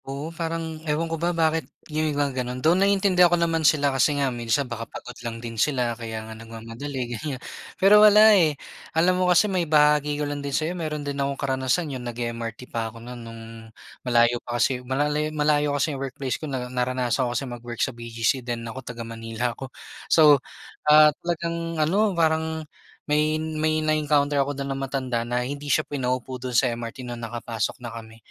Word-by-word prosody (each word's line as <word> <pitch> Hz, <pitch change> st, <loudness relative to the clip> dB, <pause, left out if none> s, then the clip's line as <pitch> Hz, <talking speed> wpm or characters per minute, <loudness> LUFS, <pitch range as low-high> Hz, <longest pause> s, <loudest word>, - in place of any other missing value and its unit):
Oo 140 Hz, +4 st, -5 dB
parang 165 Hz, -1 st, -4 dB
ewan 150 Hz, +2 st, +1 dB
ko 165 Hz, -, -5 dB
ba 170 Hz, -, +2 dB
bakit 165 Hz, -2 st, 0 dB, 0.2 s
yung 155 Hz, -1 st, 0 dB
mga 140 Hz, -3 st, 0 dB
ganun 125 Hz, 0 st, -4 dB
though 155 Hz, +6 st, +3 dB
naiintindihan 190 Hz, -2 st, +4 dB
ako 175 Hz, -, +3 dB
naman 165 Hz, -1 st, +1 dB
sila 145 Hz, -2 st, +3 dB
kasi 145 Hz, +2 st, +2 dB
nga 135 Hz, -2 st, 0 dB
minsan 120 Hz, +4 st, 0 dB
baka 115 Hz, -2 st, -6 dB
pagod 125 Hz, -, -9 dB
lang 120 Hz, -1 st, -5 dB
din 115 Hz, -1 st, -4 dB
sila 125 Hz, -5 st, +1 dB
kaya 110 Hz, -1 st, -6 dB
nga 110 Hz, -, -8 dB
nag-mamadali 115 Hz, +4 st, -6 dB
ganyan. 130 Hz, +4 st, -4 dB, 0.4 s
Pero 200 Hz, +2 st, +7 dB
wala 215 Hz, +1 st, +8 dB
eh, 160 Hz, -7 st, +3 dB, 0.4 s
alam 175 Hz, +3 st, +4 dB
mo 180 Hz, -, +2 dB
kasi 180 Hz, +4 st, +5 dB
ma-ibahagi 150 Hz, -6 st, +3 dB
ko 150 Hz, -, -1 dB
lang 145 Hz, 0 st, -4 dB
din 140 Hz, -, -4 dB
sayo 160 Hz, +3 st, -1 dB
meron 155 Hz, -4 st, -4 dB
din 140 Hz, 0 st, -3 dB
akong 140 Hz, 0 st, -1 dB
karanasan 135 Hz, +3 st, -1 dB
yung 130 Hz, -, -5 dB
nag-e-MRT 115 Hz, 0 st, -5 dB
pa 115 Hz, -1 st, -1 dB
ako 115 Hz, -, -13 dB
nun 120 Hz, +1 st, -9 dB
nung 115 Hz, 0 st, -9 dB, 0.6 s
malayo 120 Hz, -1 st, +3 dB
pa 120 Hz, 0 st, -4 dB
kasi 125 Hz, +1 st, +1 dB
mal 130 Hz, +3 st, 0 dB, 0.3 s
malayo 150 Hz, -1 st, +2 dB
kasi 145 Hz, +2 st, 0 dB
yung 135 Hz, -, -6 dB
workplace 135 Hz, -1 st, -4 dB
ko 155 Hz, -, -5 dB
na 130 Hz, -2 st, -3 dB
naranasan 125 Hz, 0 st, -1 dB
ko 120 Hz, -, -2 dB
kasi 140 Hz, -, -2 dB
mag-work 120 Hz, -1 st, -7 dB
sa 130 Hz, -, -6 dB
BGC 115 Hz, +2 st, -1 dB
then 120 Hz, -1 st, -4 dB
ako 115 Hz, +3 st, -6 dB
taga 120 Hz, -2 st, -7 dB
Manila 115 Hz, +1 st, -3 dB
ako. 135 Hz, +2 st, -8 dB, 0.4 s
So, 150 Hz, -4 st, +6 dB, 0.5 s
ah, 150 Hz, 0 st, +8 dB
talagang 170 Hz, -1 st, -3 dB
ano, 190 Hz, +5 st, +2 dB
parang 160 Hz, -1 st, +1 dB, 0.4 s
may 150 Hz, +1 st, +2 dB
may 155 Hz, 0 st, -1 dB
na-encounter 150 Hz, -2 st, +2 dB
ako 140 Hz, 0 st, -2 dB
dun 140 Hz, 0 st, -3 dB
ng 135 Hz, -, -5 dB
matanda 130 Hz, -3 st, -2 dB
na 125 Hz, +1 st, -1 dB
hindi 145 Hz, +2 st, -5 dB
siya 155 Hz, -, +2 dB
pinaupo 130 Hz, -2 st, -3 dB
dun 125 Hz, -2 st, -1 dB
sa 125 Hz, -2 st, +3 dB
MRT 115 Hz, +2 st, -7 dB
na 120 Hz, -, -5 dB
nakapasok 115 Hz, -1 st, -3 dB
na 115 Hz, -, -6 dB
kami. 115 Hz, -1 st, -10 dB
140 Hz, 195 wpm, -24 LUFS, 120-155 Hz, 0.6 s, wala